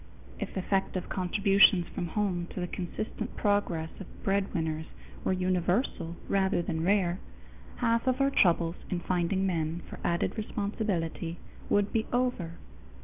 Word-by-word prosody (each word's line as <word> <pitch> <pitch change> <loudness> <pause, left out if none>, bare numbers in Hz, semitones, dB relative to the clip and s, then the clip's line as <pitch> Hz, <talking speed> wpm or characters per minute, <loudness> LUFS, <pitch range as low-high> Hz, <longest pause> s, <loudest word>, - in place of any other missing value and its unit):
If - - -4
effective 190 -1 0
contributions 195 0 +4
from 175 -2 -3
home 180 -1 -1
to - - -3
the 180 - 0
consistent 205 +6 -4
progress 200 -6 +1
of 195 - -7 0.2
breadwinners 165 -5 0 0.4
were - - +1
universal 180 0 0
rather 190 -2 +2
than 160 -1 -2
rare, 185 -1 +2 0.6
half 230 0 +1
of 255 +1 +2
our 275 0 +3
troubles 170 -5 +3
in 180 - -1
finding 185 +2 +1
men 165 -2 -1
for - - -9
added 170 0 +1
responsibility 200 -6 -2 0.3
would 205 0 +2
be 220 -1 +1
over. 245 -9 0
185 Hz, 135 wpm, -30 LUFS, 170-205 Hz, 0.6 s, contributions